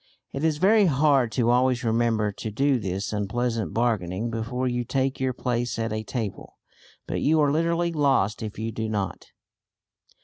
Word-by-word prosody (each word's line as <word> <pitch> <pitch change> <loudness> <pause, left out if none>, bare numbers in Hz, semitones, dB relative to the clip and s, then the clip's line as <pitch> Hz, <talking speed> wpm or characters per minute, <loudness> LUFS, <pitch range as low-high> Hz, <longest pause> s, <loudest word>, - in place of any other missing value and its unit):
It 135 - -4
is 160 -2 +2
very 200 +4 +4
hard 140 -5 +3
to 120 +1 +2
always 125 0 +2
remember 115 -2 +1
to 110 - -6
do 135 +4 +1
this 100 0 -3
unpleasant 110 -1 -1
bargaining 110 -2 -1
before 120 +3 -2
you 120 -1 -1
take 135 +2 -1
your 130 -1 0
place 120 -1 -2
at 115 -1 -2
a 110 - -2
table. 110 -2 -5 0.5
But - - -3
you 155 +2 +3
are 145 -2 +3
literally 170 +2 +1
lost 135 -10 +1
if 110 -2 -6
you 110 +1 -3
do 110 0 -3
not. 100 -3 -3
120 Hz, 170 wpm, -25 LUFS, 110-135 Hz, 0.5 s, very